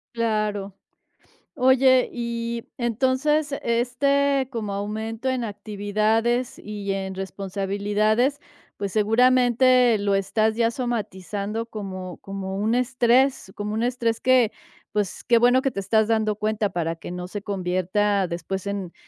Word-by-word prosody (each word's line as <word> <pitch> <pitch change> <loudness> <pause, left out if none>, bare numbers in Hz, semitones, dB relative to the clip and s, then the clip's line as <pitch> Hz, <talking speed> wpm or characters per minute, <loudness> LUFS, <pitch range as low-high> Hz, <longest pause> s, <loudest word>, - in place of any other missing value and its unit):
Claro. 215 -3 -1 0.8
Oye, 260 -1 +4
y 235 -1 -4
entonces, 260 +5 +1
este 270 +3 +1
como 220 -5 -4
aumento 220 +4 -4
en 250 -2 -2
actividades 215 +3 -1
y 205 -1 -5
en 190 -1 -3
responsabilidades, 205 +6 0 0.4
pues, 200 -1 -3
seguramente 245 +2 +4
lo 200 -1 0
estás 215 +3 +1
ya 230 0 +2
somatizando 220 -3 -3
como 185 -5 -7
como 195 -1 -6
un 215 +3 +1
estrés 250 -2 +2
como 210 +1 -4
un 220 - -1
estrés 235 -2 0
que, 255 -4 +4 0.4
pues 205 -3 -2
qué 235 -1 +4
bueno 245 +2 +4
que 270 - +1
te 200 - -4
estás 220 +2 +2
dando 220 -2 +1
cuenta 215 0 -1
para 165 -2 -2
que - - -9
no 180 0 -5
se 205 +2 -6
convierta 195 +1 0
después 190 +3 -4
en 200 -3 -4
220 Hz, 130 wpm, -24 LUFS, 200-245 Hz, 0.8 s, Oye